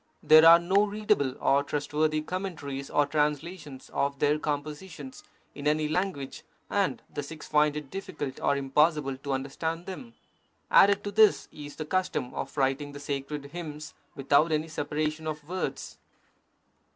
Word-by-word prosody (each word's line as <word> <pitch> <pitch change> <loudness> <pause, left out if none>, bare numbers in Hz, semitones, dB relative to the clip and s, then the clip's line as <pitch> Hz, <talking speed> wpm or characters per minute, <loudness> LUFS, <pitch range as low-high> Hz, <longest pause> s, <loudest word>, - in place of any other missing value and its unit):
There 155 +1 +8
are 165 +1 +10
no 190 +4 +2
readable 205 -10 0
or 140 +1 +3
trustworthy 155 +2 -1
com 185 +4 -3
mentaries 140 -6 -6
or 145 - +3
translations 150 -1 -3
of 140 0 0
their 150 +2 +2
compositions 150 -1 -5 0.3
in 145 0 -4
any 155 0 +2
lan 180 +5 0
guage, 140 -3 -8 0.3
and - - 0
the - - -3
Sikhs 155 +2 -9
find 150 0 +3
it 150 -3 -7
difficult 185 -8 -5
or 140 - +1
impossible 140 0 +2
to 140 +1 -4
under 135 +1 -3
stand 165 +3 -3
them. 230 +5 -8 0.6
Added 200 0 +6
to 205 - -4
this 215 0 +4
is 145 -1 -9
the 155 - -5
custom 155 -7 -1
of - - -6
writing 140 +1 0
the 145 - -8
sacred 140 0 -4
hymns 155 -3 -7 0.2
without 140 +4 +3
any 155 +1 0
separation 155 +1 -3
of 150 -1 -5
words. 185 +2 -4
150 Hz, 160 wpm, -28 LUFS, 140-165 Hz, 0.6 s, are